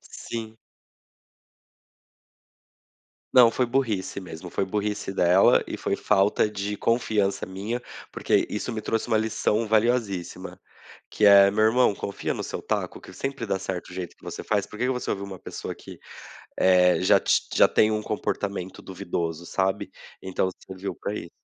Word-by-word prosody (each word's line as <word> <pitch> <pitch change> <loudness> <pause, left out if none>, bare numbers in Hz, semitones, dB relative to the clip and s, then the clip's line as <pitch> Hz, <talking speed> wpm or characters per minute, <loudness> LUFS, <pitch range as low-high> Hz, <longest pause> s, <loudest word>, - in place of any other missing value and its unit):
Sim. 110 -1 -7 2.8
Não, 125 -3 +8
foi 125 +2 0
burrice 115 -7 -1
mesmo, 90 0 -9 0.2
burrice 105 -1 -2
dela, 90 +1 +5
e - - -5
foi - - -1
falta 105 +1 +2
de 105 0 -4
confiança 110 -4 +1
minha, 100 +6 -4 0.3
porque - - +1
isso 105 +4 -4
me 110 - -3
trouxe 115 +2 -2
uma 110 -2 +2
lição 110 0 0
valiosíssima, 110 -5 0 0.5
que 105 - +2
é: 100 -1 +8
"Meu 110 +2 +2
irmão, 115 0 +4
confia 100 - -4
no - - -4
seu - - -5
taco - - -2
que - - -12
sempre 135 -3 -4
dá 100 -3 -1
certo 90 -1 -5
jeito 90 -2 -6
que - - -20
você - - -6
faz, 105 -2 0
por 105 - -11
que 125 - +1
que 130 - +1
você 125 -1 -3
ouviu 100 0 -3
uma 95 -2 -8
pessoa - - -7
que, - - -12 0.6
eh, 90 -1 +5
já 95 - +4
ti - - +3
já - - +5
tem 110 - +4
um 110 0 -1
comportamento 100 -3 -3
duvidoso", 85 -2 -4
sabe? 95 +1 -1 0.3
Então 95 0 -1 0.2
serviu 95 +1 -5
pra 100 - -5
isso. 85 - -6
100 Hz, 160 wpm, -25 LUFS, 95-110 Hz, 2.8 s, Não